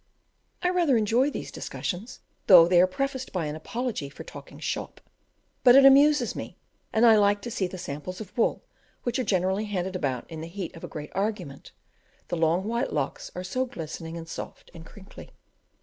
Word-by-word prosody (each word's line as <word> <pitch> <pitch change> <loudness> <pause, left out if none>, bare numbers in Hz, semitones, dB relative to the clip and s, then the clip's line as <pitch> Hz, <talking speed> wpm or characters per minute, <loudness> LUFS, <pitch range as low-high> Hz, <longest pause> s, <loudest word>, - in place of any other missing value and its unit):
I 360 - +3
rather 340 -9 +3
enjoy 230 +6 +2
these - - -6
discussions, 200 +7 -5 0.3
though 175 -4 +9
they 175 0 +5
are 185 - +5
prefaced 260 +6 -3
by 180 -4 -2
an 150 0 -4
apology 230 - -4
for 140 - -10
"talking - - -11
shop;" - - -4 0.6
but 245 0 +8
it 275 0 +8
amuses 275 -2 +6
me, - - -7 0.3
and 225 +2 +4
I 225 -2 +8
like 205 0 +3
to 240 - -5
see 190 -4 -1
the 185 - -8
samples 170 +3 -6
of 215 -4 -9
wool, 235 - +1 0.4
which 245 +2 -1
are - - +1
generally 190 0 0
handed 190 -2 -3
about 135 -8 -2
in 160 -2 -8
the 160 - -6
heat 175 0 -6
of 165 - -12
a - - -4
great 150 -1 -8
argument, 195 -9 -3 0.6
the - - -1
long 165 +2 +2
white 235 +5 -1
locks 145 -3 -3
are 180 - -4
so 255 +8 -1
glistening, 165 -4 -7
and 165 0 -8
soft, - - -8
and 165 -1 -11
crinkly. 200 -2 -13
190 Hz, 195 wpm, -26 LUFS, 165-240 Hz, 0.6 s, though